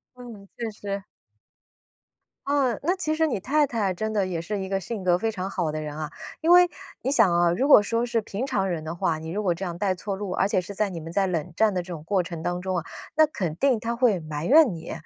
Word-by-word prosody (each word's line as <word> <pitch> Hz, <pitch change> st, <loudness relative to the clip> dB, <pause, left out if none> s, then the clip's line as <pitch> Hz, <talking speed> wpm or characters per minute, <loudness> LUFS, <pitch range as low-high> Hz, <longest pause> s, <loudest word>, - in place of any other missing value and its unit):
嗯， 230 Hz, -6 st, -11 dB
确 230 Hz, -2 st, -3 dB
实。 200 Hz, -1 st, -5 dB, 1.4 s
啊， 280 Hz, -4 st, +2 dB
那 360 Hz, +5 st, +1 dB
其 315 Hz, -4 st, -1 dB
实 320 Hz, 0 st, +2 dB
你 275 Hz, -, -1 dB
太 295 Hz, +8 st, +2 dB
太 220 Hz, -7 st, -1 dB
真 220 Hz, +4 st, -3 dB
的 200 Hz, -3 st, +1 dB
也 175 Hz, -3 st, -3 dB
是 200 Hz, +5 st, -3 dB
一 190 Hz, -, -4 dB
个 195 Hz, 0 st, -1 dB
性 200 Hz, +1 st, -5 dB
格 175 Hz, -1 st, +3 dB
非 225 Hz, +4 st, 0 dB
常 190 Hz, -2 st, -4 dB
好 175 Hz, -5 st, -1 dB
的 155 Hz, -, -3 dB
人 150 Hz, 0 st, -6 dB
啊。 155 Hz, -1 st, -4 dB, 0.3 s
因 325 Hz, -, +1 dB
为 355 Hz, 0 st, +8 dB, 0.3 s
你 265 Hz, -, 0 dB
想 215 Hz, -9 st, +4 dB
啊， 175 Hz, 0 st, +4 dB
如 255 Hz, +11 st, 0 dB
果 215 Hz, -, +9 dB
说 230 Hz, +3 st, 0 dB
是 235 Hz, -1 st, 0 dB
平 210 Hz, +6 st, -4 dB
常 195 Hz, -7 st, 0 dB
人 160 Hz, -3 st, -3 dB
的 160 Hz, +2 st, -4 dB
话， 165 Hz, -2 st, 0 dB
你 160 Hz, +1 st, -7 dB
如 205 Hz, +5 st, -2 dB
果 180 Hz, -4 st, +1 dB
这 190 Hz, -, -5 dB
样 170 Hz, -1 st, -4 dB
带 190 Hz, +1 st, 0 dB
错 195 Hz, +2 st, -4 dB
路， 200 Hz, -1 st, -5 dB
而 195 Hz, -, +1 dB
且 185 Hz, -, +2 dB
是 200 Hz, +3 st, -8 dB
在 210 Hz, +1 st, +1 dB
你 180 Hz, -3 st, -6 dB
们 165 Hz, +1 st, -8 dB
在 195 Hz, +1 st, +2 dB
冷 175 Hz, -2 st, -2 dB
战 215 Hz, -3 st, +3 dB
的 180 Hz, -, 0 dB
这 180 Hz, -, -9 dB
种 160 Hz, -3 st, -7 dB
过 190 Hz, +1 st, +1 dB
程 170 Hz, -2 st, -7 dB
当 175 Hz, +1 st, -2 dB
中 185 Hz, -1 st, -1 dB
啊， 170 Hz, -, -4 dB, 0.3 s
那 310 Hz, 0 st, +6 dB
肯 185 Hz, -, -3 dB
定 265 Hz, 0 st, +2 dB
她 235 Hz, +1 st, -2 dB
会 235 Hz, -6 st, +3 dB
埋 155 Hz, 0 st, -5 dB
怨 290 Hz, -, +6 dB
你。 160 Hz, -, -7 dB
195 Hz, 285 characters per minute, -25 LUFS, 175-235 Hz, 1.4 s, 果